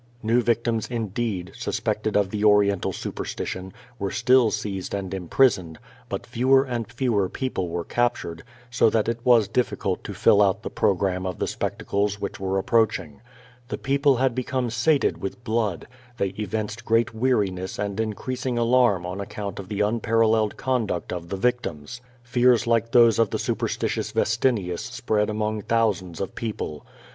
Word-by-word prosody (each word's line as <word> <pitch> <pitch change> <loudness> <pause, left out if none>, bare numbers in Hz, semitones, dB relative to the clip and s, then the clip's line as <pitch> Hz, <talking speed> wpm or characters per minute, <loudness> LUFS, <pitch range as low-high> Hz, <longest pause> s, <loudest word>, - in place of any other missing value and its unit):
New 115 +3 +3
victims, 115 -1 0
infleed, 110 -5 -3
suspected 110 -1 -1
of 100 -2 +1
the 105 - -3
Orien 105 -2 +4
tal - - -1
superstition, 95 +1 -5 0.3
were 100 -1 -1
still 125 +3 +4
seized 100 -3 -3
and 95 -1 -4
imprisoned; 90 -2 +2 0.3
but - - -4
fewer 130 +3 +3
and 120 -4 -4
fewer 115 -6 0
people 110 -9 -3
were 85 0 -3
capture^, 120 -9 -1 0.3
so 125 -2 +4
that 110 -1 +1
it 115 0 -1
was 120 -5 +5
ditticult 125 - -1
to - - -7
fill 105 - +5
out 100 +1 +2
the - - -5
programme 95 -1 0
of 90 - -4
the - - -1
specmeles 100 0 -1
which 100 - -5
were 95 0 -1
approach 110 +2 +2
ing. 75 -3 -12 0.5
The - - -4
people 140 0 +2
had 130 0 +1
become 130 -1 -2
sated 135 +6 +2
with 100 +5 -5
blood; 110 -6 -1 0.3
they 100 - 0
evinced 105 +3 -4
great 115 +1 +2
weariness 100 -6 0
and 100 0 -3
increasing 125 +4 -2
alarnr^on 115 -6 +2
account 100 0 -6
of 95 -1 -8
the 105 -1 0
un 110 +3 0
paralleled 110 -1 +2
conduct 115 -11 -1
of 85 -1 -6
the 95 - -3
victims. 120 - -2 0.2
Fears 125 -1 +3
like 115 0 +1
those 115 -2 +6
of 115 - +3
the - - -2
su - - -1
persitious - - -2
Vestinius 110 -6 +1
spread 105 -1 -1
among 110 0 -2
thousands 100 -7 0
of 95 - -4
people. 105 -9 -5
110 Hz, 165 wpm, -24 LUFS, 95-120 Hz, 0.5 s, those